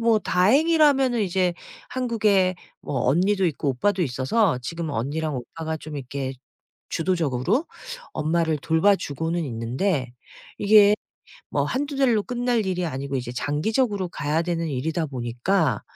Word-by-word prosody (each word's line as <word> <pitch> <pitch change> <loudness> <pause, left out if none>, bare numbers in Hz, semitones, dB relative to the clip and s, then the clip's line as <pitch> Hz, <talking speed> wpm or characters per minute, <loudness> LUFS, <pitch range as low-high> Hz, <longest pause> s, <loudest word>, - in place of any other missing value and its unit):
뭐 230 -2 +3
다행이라면은 270 - +3
이제 185 -2 +1 0.3
한국에 210 -7 +1 0.3
뭐 135 - -3
언니도 190 +6 +2
있고 150 -3 -1
오빠도 185 +10 0
있어서 145 - +1
지금은 165 +3 -4
언니랑 145 +6 -2
오빠가 160 +6 -5
좀 155 -1 -8
이렇게 135 0 -4 0.5
주도적으로 170 - 0 0.5
엄마를 160 0 0
돌봐 165 +7 +3
주고는 165 +2 -3
있는데 125 - -2 0.5
이게 205 0 +6 0.6
뭐 - - +1
1-2 285 +2 -2
달로 245 -6 +3
끝날 245 -2 -1
일이 180 -1 -1
아니고 140 -2 -3
이제 125 -1 -4
장기적으로 190 - 0
가야 155 +1 -1
되는 170 -1 -2
일이다 155 +4 -2
보니까 125 - 0
170 Hz, 310 characters per minute, -24 LUFS, 140-205 Hz, 0.6 s, 이게